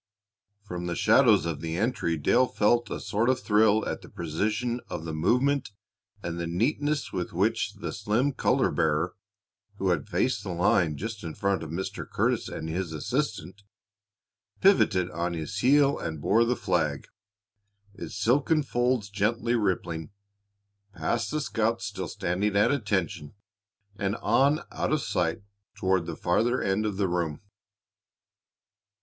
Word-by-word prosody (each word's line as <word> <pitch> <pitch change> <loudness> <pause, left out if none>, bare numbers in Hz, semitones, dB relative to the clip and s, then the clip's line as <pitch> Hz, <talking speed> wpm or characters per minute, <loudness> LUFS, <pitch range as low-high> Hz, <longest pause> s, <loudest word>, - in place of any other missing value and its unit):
From 90 -3 -5
the 85 - -2
shadows 80 - +5
of 80 -3 -3
the 80 0 -3
entry 105 -6 0
Dale 125 - +3
felt 120 +2 +2
a - - -4
sort 110 +4 0
of 130 - +2
thrill 110 0 +3
at - - -3
the - - -13
precision 105 +9 -2
of 80 - -5
the 80 - -4
movement 125 - +1 0.5
and 85 0 -4
the 85 - -2
neatness 145 - -1
with 90 - -3
which 105 +3 0
the 100 - -6
slim 110 +7 +1
color - - +2
bearer, - - +1 0.6
who - - 0
had - - 0
faced - - 0
the 90 - -5
line 85 -3 +2
just 110 +1 -5
in 80 -2 -6
front 100 -3 0
of 80 - -6
Mr. 85 +4 -5
Curtis - - 0
and 80 - -5
his 85 0 -3
assistant, 100 - -3 1.0
pivoted 100 - +4
on 85 +2 -2
his 85 +6 -4
heel 140 +4 +4
and 80 -2 -4
bore 110 +10 +3
the 125 +1 +1
flag, 75 - -1 0.9
its 100 - -8
silken 140 +9 +2
folds 120 -4 0
gently 110 +4 0
rippling, 85 -7 -1 0.9
past 90 +9 -1
the 155 0 -1
scouts 115 -3 -1
still 95 -2 -4
standing 95 +6 -1
at 100 - +4
attention 95 - -2 0.6
and 100 +1 -1
on 140 +9 +2
out - - -2
of 155 -2 +1
sight 90 +3 -1 0.3
toward 95 -2 +1
the 85 - -4
farther 115 +8 +1
end 100 +3 0
of 100 -2 -3
the 100 -2 +1
room. 85 -4 -1
100 Hz, 150 wpm, -27 LUFS, 85-120 Hz, 1.0 s, shadows